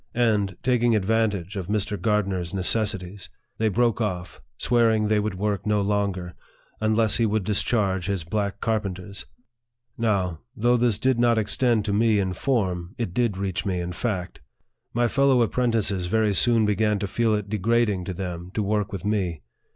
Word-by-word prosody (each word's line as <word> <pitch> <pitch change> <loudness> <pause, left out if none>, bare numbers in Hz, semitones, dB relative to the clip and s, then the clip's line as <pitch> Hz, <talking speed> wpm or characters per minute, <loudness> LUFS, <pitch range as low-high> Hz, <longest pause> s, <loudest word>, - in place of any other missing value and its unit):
And, 105 -6 +1
taking 120 -2 +3
advantage 105 -2 0
of 95 -3 -4
Mr. 105 0 -1
Gardner's 100 -5 0
necessities, 100 -1 -1 0.3
they 110 0 +2
broke 115 +2 +1
off, 90 -4 -4 0.2
swearing 115 -4 +2
they 105 -1 +3
Would 105 -2 -2
work 100 0 -2
no 105 -1 +2
longer, 100 -3 -1 0.5
unless 110 0 +2
he 115 -1 +2
would 110 -1 0
discharge 95 -2 0
his 100 -4 -1
black 100 +3 -3
carpen 105 -4 -1
ters. 95 +2 -10 0.7
Now, 95 -7 0 0.2
though 120 +3 +3
this 120 -4 +2
did 130 +2 +1
not 120 -1 +3
extend 110 +1 +1
to 100 - -1
me 110 +1 +3
in 95 -2 -1
form, 95 -6 -1
it 115 -8 -3
did 115 -3 0
reach 95 0 -2
me 95 -3 -1
in 90 0 -3
fact. 90 - -3 0.5
My 120 0 +1
fellow 135 -1 +3
apprentices 110 -6 0
very 110 +1 +2
soon 115 +2 +3
began 105 0 +1
to 100 - -2
feel 110 +2 +1
it 105 -1 -3
degrading 105 -2 +1
to 95 - -4
them 90 -1 -5
to 110 - 0
work 105 0 -1
with 95 -1 -6
me. 95 -7 -1
105 Hz, 170 wpm, -24 LUFS, 95-115 Hz, 0.7 s, taking